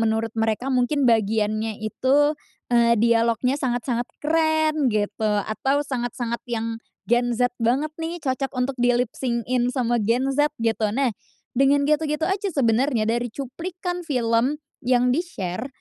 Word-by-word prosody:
menurut 225 Hz, 0 st, 0 dB
mereka 225 Hz, +4 st, 0 dB
mungkin 255 Hz, +2 st, +2 dB
bagiannya 215 Hz, -1 st, +1 dB
itu, 275 Hz, +7 st, +2 dB, 0.4 s
eee, 235 Hz, -1 st, +4 dB
dialognya 235 Hz, +2 st, +2 dB
sangat-sangat 245 Hz, -2 st, -1 dB
keren, 315 Hz, -2 st, +2 dB
gitu. 215 Hz, 0 st, 0 dB
Atau 275 Hz, +6 st, 0 dB
sangat-sangat 240 Hz, -2 st, -3 dB
yang 225 Hz, -1 st, -2 dB, 0.3 s
Gen 240 Hz, 0 st, +2 dB
Z 245 Hz, +1 st, +2 dB
banget 255 Hz, +7 st, +1 dB
nih, 330 Hz, +1 st, -4 dB
cocok 270 Hz, -1 st, -2 dB
untuk 250 Hz, +1 st, -2 dB
di 245 Hz, 0 st, +3 dB
lipsync-in 245 Hz, 0 st, -1 dB
sama 240 Hz, -2 st, +1 dB
Gen 240 Hz, +5 st, +1 dB
Z, 290 Hz, +2 st, +3 dB, 0.2 s
gitu. 225 Hz, -1 st, +1 dB
Nah, 270 Hz, -2 st, +2 dB, 0.4 s
dengan 275 Hz, +2 st, +3 dB
gitu-gitu 300 Hz, +1 st, 0 dB
aja 385 Hz, +3 st, -1 dB
sebenarnya, 245 Hz, -2 st, +2 dB
dari 240 Hz, +1 st, 0 dB
cuplikan 350 Hz, -, -5 dB
film 245 Hz, 0 st, +1 dB, 0.2 s
yang 250 Hz, 0 st, +2 dB
di-share, 245 Hz, -, -2 dB
245 Hz, 135 wpm, -23 LUFS, 230-280 Hz, 0.4 s, eee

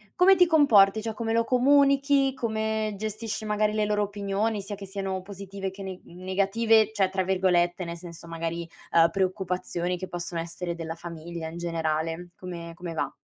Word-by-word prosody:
come 380 Hz, +2 st, +6 dB
ti 360 Hz, 0 st, +6 dB
comporti, 220 Hz, -, +5 dB
cioè 220 Hz, 0 st, -3 dB
come 225 Hz, 0 st, -2 dB
lo 230 Hz, 0 st, +3 dB
comunichi, 275 Hz, +1 st, +4 dB
come 220 Hz, -3 st, -1 dB
gestisci 220 Hz, +1 st, -4 dB
magari 210 Hz, 0 st, +1 dB
le 215 Hz, -1 st, +1 dB
loro 210 Hz, 0 st, +1 dB
opinioni 205 Hz, +1 st, -1 dB
sia 200 Hz, +1 st, -6 dB
che 195 Hz, 0 st, -9 dB
siano 195 Hz, -1 st, -3 dB
positive 195 Hz, -1 st, -6 dB
che 195 Hz, +1 st, -11 dB
ne 190 Hz, -1 st, -6 dB
negative 200 Hz, +5 st, +2 dB
cioè, 195 Hz, -3 st, +2 dB
tra 190 Hz, 0 st, 0 dB
virgolette, 180 Hz, -1 st, +2 dB
nel 170 Hz, 0 st, -5 dB
senso, 170 Hz, -1 st, -11 dB
magari, 165 Hz, 0 st, -4 dB, 0.2 s
uhm, 165 Hz, 0 st, +6 dB
"preoccupazioni" 180 Hz, -1 st, -1 dB
che 185 Hz, +1 st, -6 dB
possono 175 Hz, -1 st, -4 dB
essere 170 Hz, +1 st, -4 dB
della 165 Hz, -1 st, -5 dB
famiglia 170 Hz, -1 st, -7 dB
in 170 Hz, -, -8 dB
generale. 165 Hz, 0 st, -2 dB
Come 170 Hz, -2 st, -7 dB
come 170 Hz, -1 st, -6 dB
va? 155 Hz, -, -2 dB
195 Hz, 170 wpm, -27 LUFS, 175-220 Hz, 0.2 s, come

